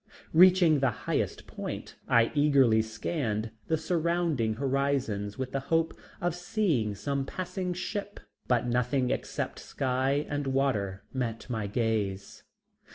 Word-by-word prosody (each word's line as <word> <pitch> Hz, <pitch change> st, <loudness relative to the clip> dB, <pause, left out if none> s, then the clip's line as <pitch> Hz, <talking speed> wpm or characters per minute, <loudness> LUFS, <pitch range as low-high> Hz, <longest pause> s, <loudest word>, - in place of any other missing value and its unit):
Reaching 175 Hz, -3 st, +7 dB
the 135 Hz, -1 st, +3 dB, 0.2 s
highest -, -, -1 dB
point, -, -, -6 dB
I 115 Hz, -1 st, +4 dB
eagerly 140 Hz, -7 st, +4 dB
scanned 110 Hz, -1 st, -2 dB, 0.2 s
the 160 Hz, -, +2 dB
surrounding 160 Hz, -8 st, 0 dB
horizons 130 Hz, -6 st, -1 dB
with 130 Hz, -1 st, -3 dB
the 135 Hz, -, -1 dB
hope 165 Hz, 0 st, +2 dB, 0.3 s
of 175 Hz, -1 st, 0 dB
seeing 175 Hz, -, 0 dB
some 140 Hz, +6 st, -2 dB
passing 180 Hz, +4 st, -3 dB
ship, 205 Hz, +2 st, -4 dB, 0.3 s
but 125 Hz, -1 st, +2 dB
nothing 125 Hz, +1 st, +1 dB
except -, -, -3 dB
sky 135 Hz, +3 st, 0 dB
and 145 Hz, -1 st, -2 dB
water 120 Hz, -8 st, 0 dB
met 120 Hz, -4 st, -3 dB
my 110 Hz, -3 st, -2 dB
gaze. 105 Hz, -3 st, -1 dB
135 Hz, 125 wpm, -29 LUFS, 115-160 Hz, 0.3 s, Reaching